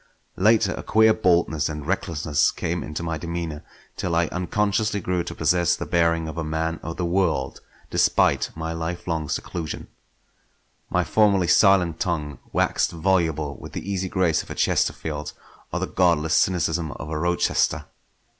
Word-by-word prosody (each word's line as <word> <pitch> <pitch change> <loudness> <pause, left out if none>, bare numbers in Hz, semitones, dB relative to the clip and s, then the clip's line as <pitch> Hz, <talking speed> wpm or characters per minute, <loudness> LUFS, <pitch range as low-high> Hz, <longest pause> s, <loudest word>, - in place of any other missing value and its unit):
Later 105 0 +4
a - - -6
queer 110 0 +4
boldness 85 -7 +2
and 75 -2 -6
recklessness 80 -5 +1
came 85 +2 -3
into 75 +3 -5
my 80 -2 -3
demeanour, 85 -3 -4 0.3
till 85 -2 -2
I 85 +1 +3
unconsciously 105 +3 0
grew 90 -2 -1
to 85 - -7
possess 85 +1 +2
the - - -5
bearing 85 -1 +1
of 80 +1 -5
a - - -2
man 80 +1 -2
of 80 +1 -6
the 90 - -1
world 85 -6 0 0.3
despite - - +2
my 80 +1 -4
lifelong 80 -2 -3
seclusion. 80 +2 -4 1.0
My - - +1
formerly 100 -4 +3
silent 90 -2 +4
tongue 75 -6 -2
waxed - - +1
voluble 80 -4 0
with - - -10
the - - -6
easy 95 -1 -2
grace 90 -5 +1
of - - -15
a - - -6
Chesterfield 75 -1 -1 0.4
or - - -1
the - - -1
godless 85 -4 +2
cynicism 85 -3 +1
of 75 - -8
a 75 - -2
Rochester. 85 +2 +1
85 Hz, 155 wpm, -24 LUFS, 80-90 Hz, 1.0 s, Later